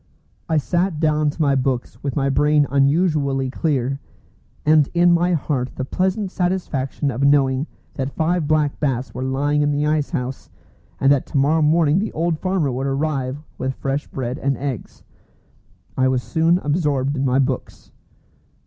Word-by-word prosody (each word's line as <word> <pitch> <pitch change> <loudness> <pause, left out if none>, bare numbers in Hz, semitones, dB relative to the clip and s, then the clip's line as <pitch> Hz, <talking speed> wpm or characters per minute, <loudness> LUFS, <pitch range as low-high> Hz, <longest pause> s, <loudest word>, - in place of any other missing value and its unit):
I 160 - +2
sat 175 +2 0
down 155 -1 +2
to 145 - -7
my 140 -1 +3
books 130 -2 -1
with 140 -3 -3
my 140 -2 +1
brain 150 +2 +3
unusually 140 -2 +2
clear, 135 -2 -1 0.7
and 150 -2 +4
in 175 0 +5
my 175 +1 +2
heart 135 -5 -2
the 130 - -3
pleasant 190 +5 -1
satisfaction 160 -7 -1
of 125 +2 -4
knowing 140 0 +3 0.3
that 135 -1 -3
five 165 -1 0
black 150 -2 +1
bass 130 -3 -1
were - - -5
lying 140 +3 0
in 145 - +2
the 145 0 0
ice 150 -1 +1
house, 130 -5 -4 0.5
and 135 - +4
that 140 -2 +2
to 145 - -2
morrow 150 +4 +3
morning 155 +1 +3
the 215 - -2
old 165 0 -1
farmer 185 -7 0
would 130 +2 -2
arrive 135 0 -2 0.2
with 130 0 -2
fresh 140 +2 -3
bread 130 0 -4
and 135 -1 0
eggs. 135 -5 -6 0.9
I 130 0 +2
was 130 -1 0
soon 165 +2 +2
absorbed 145 -3 0
in 135 - -1
my 130 -1 +2
books. 135 -2 -2
145 Hz, 165 wpm, -21 LUFS, 135-155 Hz, 0.9 s, in